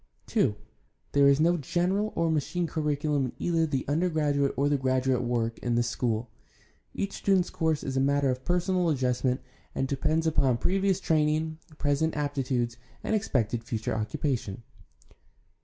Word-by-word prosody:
II. - - +3 0.6
There 140 0 +5
is 140 +1 +5
no 170 +2 +3
general 185 +8 0
or 165 -1 +1
machine 160 +3 0
curriculum 150 -3 0
in 125 - -5
either 165 -2 +1
the 135 -4 -2
under 165 +6 +1
graduate 145 -3 +1
or 140 - +2
the 145 - +2
graduate 130 -1 +1
work 120 -2 -1
in 120 -1 -1
this 120 0 +1
School. 120 -2 -1 0.7
Each 200 - -2
student's 190 -3 +1
course 160 -4 0
is 135 - -3
a - - +2
matter 140 0 +2
of 130 +1 -4
personal 180 +1 +1
adjustment 125 -2 0 0.3
and 135 - 0
depends 155 +4 0
upon 135 -6 +2
previ 195 - +1
ous 190 -1 +2
training, 155 -1 +1 0.2
present 150 +2 0
aptitudes, 130 -5 -1 0.3
and - - -1
expected 120 - 0
future 115 -2 -3
occupation. 110 -1 -2
145 Hz, 155 wpm, -28 LUFS, 130-160 Hz, 0.7 s, There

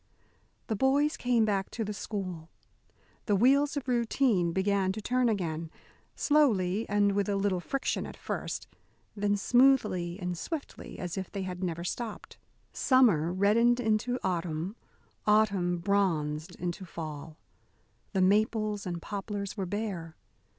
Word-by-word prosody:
The 220 - -2
boys 280 +6 +2
came 240 -3 +2
back 195 -2 0
to 230 - -3
the 210 - -3
school. 185 -6 -5 0.8
The 205 - +3
wheels 280 +7 +4
of 270 - -4
routine 235 -6 +2
began 190 +1 +1
to 215 - -5
turn 250 +3 +1
again, 165 -6 -2 0.5
slowly 225 -9 +2
and 205 0 +3
with 200 0 0
a 200 - +1
little 195 -2 +1
friction 275 +9 -2
at - - -10
first, - - -4 0.5
then 205 0 +1
smoothly 210 -7 +3
and 180 -2 -3
swiftly 305 - -6
as 180 0 -4
if 190 - -6
they 200 -2 -3
had 180 0 -5
never 170 -1 -2
stopped. 220 +4 -5 0.3
Summer 215 - +4
reddened 225 +6 +3
into 230 +2 +1
autumn; 175 +1 -2 0.5
autumn 200 -5 +3
bronzed 170 -4 0
into 180 +2 -4
fall. 155 -3 -7 0.8
The 190 - +2
maples 210 +1 +2
and 175 -2 -4
poplars 200 -1 -4
were 195 -3 -3
bare. 185 -5 -4
200 Hz, 135 wpm, -29 LUFS, 180-225 Hz, 0.8 s, wheels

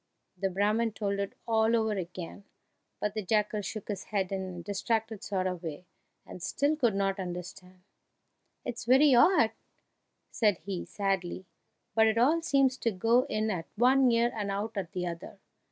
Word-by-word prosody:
The 195 +1 -1
Brahman 210 +4 +1
told 200 -2 -2
it 200 0 -3
all 225 0 +3
over 220 -1 +1
again, 185 -1 -6 0.6
but 210 -1 -1
the 215 - -2
jackal 210 +1 0
shook 210 +1 -6
his 200 -3 -4
head 195 -3 -2
in 195 -1 -2
a 175 - -8
distracted 220 +2 -2
sort 190 -2 -1
of 180 -2 -2
way, 165 +1 -6 0.4
and 180 - -10
still 285 - +1
could 240 -9 +1
not 195 0 0
understand. 180 0 -7 0.8
"It's 240 -2 -5
very 265 +3 +6
odd," 245 - +5 0.8
said 210 -5 +2
he, 190 0 -5
sadly, 190 -2 -2 0.5
"but 220 0 +5
it 220 +1 +1
all 295 +8 +4
seems 275 -4 +2
to 230 - +1
go 230 +6 +3
in 215 0 0
at 170 -4 -4
one 255 +3 +5
ear 235 +1 +3
and 205 -2 -3
out 205 +3 -3
at 190 -4 -4
the 180 -1 -2
other! 170 -1 -6
210 Hz, 170 wpm, -29 LUFS, 185-230 Hz, 0.8 s, very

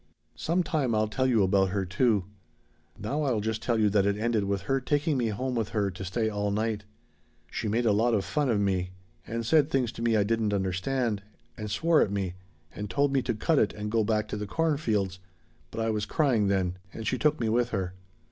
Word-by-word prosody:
"Some 175 +3 0
time 150 -10 0
I'll 110 0 +2
tell 130 +5 0
you 115 -5 +3
about 95 0 +3
her, 95 0 -1
too. 100 +1 +2 0.7
Now 135 +9 -2
I'll 130 -7 +1
just 110 +1 -2
tell 120 -1 +1
you 105 - +4
that 100 -1 +3
it 100 0 +1
ended 110 -2 +1
with 100 -1 -1
her 135 +7 0
taking 145 +3 +1
me 120 -3 +1
home 125 +5 -2
with 115 -3 -1
her 100 -3 0
to 95 +2 -7
stay 110 +4 -1
all 105 -1 -1
night. 105 0 -1 0.7
She - - -3
made 115 +3 +1
a 110 - +4
lot 115 +3 +3
of 100 -3 0
fun 135 +10 0
of 110 -3 +2
me 95 -2 0 0.3
and 115 0 -3
said 150 +3 +4
things 125 -6 +1
to 115 - -9
me 115 -1 +2
I 105 - +4
didn't 110 -1 0
understand 100 +4 -1 0.3
and 105 -1 -5
swore 165 +8 +3
at - - +2
me 95 -3 -2 0.4
and 105 0 -5
told 140 -1 +1
me 135 - +3
to 120 -2 -2
'cut 150 +8 +2
it' 105 - +2
and 105 0 -5
go 115 -1 +2
back 105 0 0
to - - -3
the 105 0 -4
cornfields 110 - 0 0.5
but - - -6
I 115 0 +1
was 105 -1 -2
crying 125 -9 +2
then, 95 -2 0
and 110 - -7
she 130 - 0
took 150 0 +2
me 115 - 0
with 120 +2 +2
her. 95 -5 -2
110 Hz, 230 wpm, -28 LUFS, 100-125 Hz, 0.7 s, you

